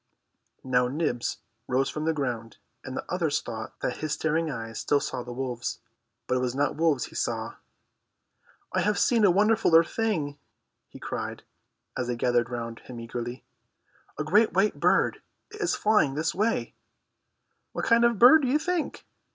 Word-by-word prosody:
Now 125 -1 +2
Nibs 130 -3 -2 0.3
rose 130 +2 +1
from 155 0 -4
the 160 - +2
ground, 120 -6 -3 0.3
and 130 0 -6
the - - -4
others 165 -5 0
thought 110 -2 -7
that 125 - -2
his 155 -1 -2
staring 160 +2 0
eyes 115 -4 -5
still 145 - +2
saw 125 - -4
the 125 - -8
wolves. 125 -1 -3 0.5
But 125 - 0
it - - 0
was 125 0 -1
not 145 0 0
wolves 155 -5 +2
he - - -13
saw. - - -2 1.2
"I - - +2
have 210 0 +1
seen 230 -3 +3
a 200 - +7
wonderfuller 200 -4 +5
thing," 160 -11 -2 0.5
he - - -12
cried, - - -5 0.5
as 125 - -2
they 120 - -1
gathered 120 0 +1
round 115 -1 -5
him 125 -2 -10
eagerly. 120 +2 -6 0.7
"A - - -1
great 210 +8 +3
white 195 +4 +2
bird. - - +2 0.3
It 425 - -9
is - - +1
flying 210 -11 +2
this 155 +1 0
way." 215 +5 0 1.0
"What - - -3
kind 230 +1 +4
of 235 0 +5
a - - -7
bird, 255 +9 +8
do 265 - 0
you 270 +4 +3
think?" 350 +1 -2
150 Hz, 175 wpm, -27 LUFS, 125-205 Hz, 1.2 s, bird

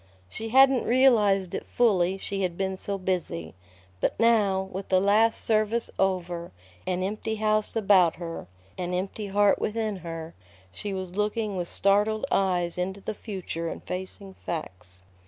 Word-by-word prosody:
She 225 - -6
hadn't 265 +1 +5
realized 210 -8 +4
it - - -3
fully, 195 -6 +2
she 195 0 -4
had 175 -2 -1
been 190 -1 -1
so 200 +1 -3
busy. 180 - -3 0.5
But - - -1
now, 210 -5 +3
with 190 +1 -6
the 185 - +4
last 215 +4 +3
service 220 +1 +1
over, 175 -3 -1 0.4
an 185 0 0
empty 215 +3 -3
house 215 0 0
about 195 -6 +4
her, 165 - -7 0.3
an 180 0 -2
empty 195 +3 -3
heart 200 0 +3
within 215 -2 -2
her, 165 -2 -7 0.4
she 205 - -5
was 185 -1 -5
looking 210 0 -1
with 175 -2 -3
startled 210 +5 +2
eyes 180 -3 +1
into 190 +2 -2
the 215 - -4
future 185 -6 -5
and - - -7
facing 190 +1 -6
facts. 90 - -7
195 Hz, 155 wpm, -26 LUFS, 180-215 Hz, 0.5 s, hadn't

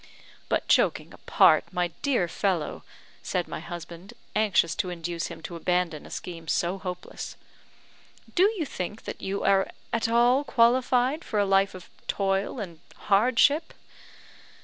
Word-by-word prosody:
"But, - - 0
joking - - +2
apart, - - +4
my 175 -1 0
dear 255 -11 +1
fellow," 175 -1 -1 0.4
said - - -2
my - - -5
husband, 175 +5 -9 0.2
anxious 205 -6 +3
to 185 - -1
induce 170 -1 -4
him 165 - -10
to 175 - -6
abandon 175 -2 -1
a - - -13
scheme 165 -2 -7
so 175 +5 0
hopeless, 180 -2 -6 1.0
"do 385 +4 +4
you 325 - -1
think 210 -3 -5
that - - -7
you 195 +1 -3
are 195 -1 +3 0.2
at 230 0 +1
all 240 +4 +4
qualified 255 +3 +3
for 215 - -3
a 205 - +3
life 195 0 +2
of 185 - -11 0.2
toil 195 +4 0
and 170 -6 -7 0.2
hardship?" 255 +9 +3
195 Hz, 145 wpm, -27 LUFS, 175-235 Hz, 1.0 s, apart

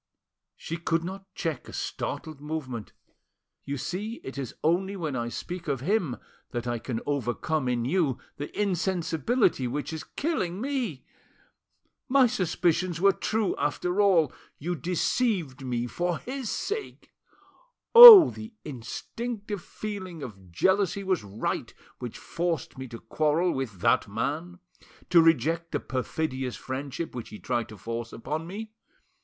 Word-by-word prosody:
She 165 - -5
could 165 0 0
not 195 +2 -7
check 165 -4 -3
a - - -10
startled 155 -3 -4
movement. 140 -8 -5 0.7
"You 140 0 -3
see 205 - -4
it 135 - -7
is 135 -4 -5
only 190 +5 +1
when 160 -7 -3
I 120 -1 -2
speak 175 +7 -6
of 135 -4 -1
him 175 - 0 0.3
that 120 -2 -4
I 120 -1 -2
can 115 -1 -4
overcome 140 +1 -1
in 120 -1 0
you 150 -3 +1 0.2
the 145 - -5
insensibility 185 - +1
which 145 +5 -3
is 160 - -5
killing 195 - -2
me. 250 - -3 1.0
My 270 0 +6
suspicions 180 -5 0
were 195 +2 +6
true 215 +1 -1
after 180 +6 0
all: 175 -8 +4 0.2
you 175 +5 -3
deceived 175 - 0
me 120 -2 -1
for 175 +6 -1
his 260 -2 -5
sake. 425 +1 -4 0.8
Oh! 460 -7 +13
the 220 +1 -10
instinctive 205 - -5
feeling 185 -6 -6
of 95 -6 -10
jealousy 190 - +2
was 185 - 0
right 100 +2 -3 0.3
which 120 -3 -6
forced 170 -1 -3
me 130 0 -7
to 115 -1 -8
quarrel 155 +8 +1
with 115 - -4
that - - +3
man, 145 - -3 0.5
to 170 -2 +8
reject 165 +1 +2
the - - 0
perfidious 130 0 -3
friendship 135 +4 -5
which 120 -3 -6
he 105 - -9
tried 120 -1 -2
to 110 - -10
force 115 +3 -5
upon 155 +7 -4
me. 215 +4 -7
165 Hz, 140 wpm, -27 LUFS, 130-190 Hz, 1.0 s, Oh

